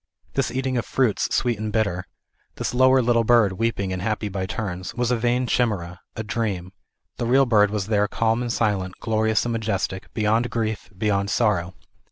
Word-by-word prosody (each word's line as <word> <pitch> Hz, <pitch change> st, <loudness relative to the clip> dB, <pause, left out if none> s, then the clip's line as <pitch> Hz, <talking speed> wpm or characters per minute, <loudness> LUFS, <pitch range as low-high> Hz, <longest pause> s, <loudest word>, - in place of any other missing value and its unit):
This -, -, 0 dB
eating 130 Hz, 0 st, -1 dB
of 120 Hz, -, -1 dB
fruits 125 Hz, -6 st, +1 dB
sweet 120 Hz, -4 st, +1 dB
and 110 Hz, 0 st, -3 dB
bitter, 95 Hz, -5 st, -1 dB, 0.5 s
this -, -, -3 dB
lower 130 Hz, +1 st, +5 dB
little 115 Hz, -1 st, +3 dB
bird, 115 Hz, -3 st, +4 dB
weeping 105 Hz, -5 st, 0 dB
and 90 Hz, -, -4 dB
happy 105 Hz, +1 st, -1 dB
by 95 Hz, -1 st, -3 dB
turns, 95 Hz, -4 st, -4 dB
was 120 Hz, 0 st, 0 dB
a -, -, +3 dB
vain 120 Hz, +2 st, +1 dB
chimera, 95 Hz, -9 st, -1 dB, 0.2 s
a 110 Hz, -, -4 dB
dream, 100 Hz, -5 st, -3 dB, 0.4 s
the 120 Hz, -, -2 dB
real 135 Hz, +3 st, +5 dB
bird 105 Hz, -4 st, +4 dB
was 105 Hz, -2 st, -2 dB
there 105 Hz, -1 st, +2 dB
calm 115 Hz, +3 st, 0 dB
and 120 Hz, -1 st, -2 dB
silent, 100 Hz, -5 st, 0 dB
glorious 110 Hz, 0 st, +1 dB
and 120 Hz, -, -1 dB
majes 110 Hz, -4 st, 0 dB
tic; 95 Hz, 0 st, -9 dB
beyond 110 Hz, +2 st, +1 dB
grief, 110 Hz, -2 st, -3 dB
beyond 100 Hz, -1 st, 0 dB
sorrow. 100 Hz, -7 st, +1 dB
110 Hz, 190 wpm, -23 LUFS, 100-120 Hz, 0.5 s, lower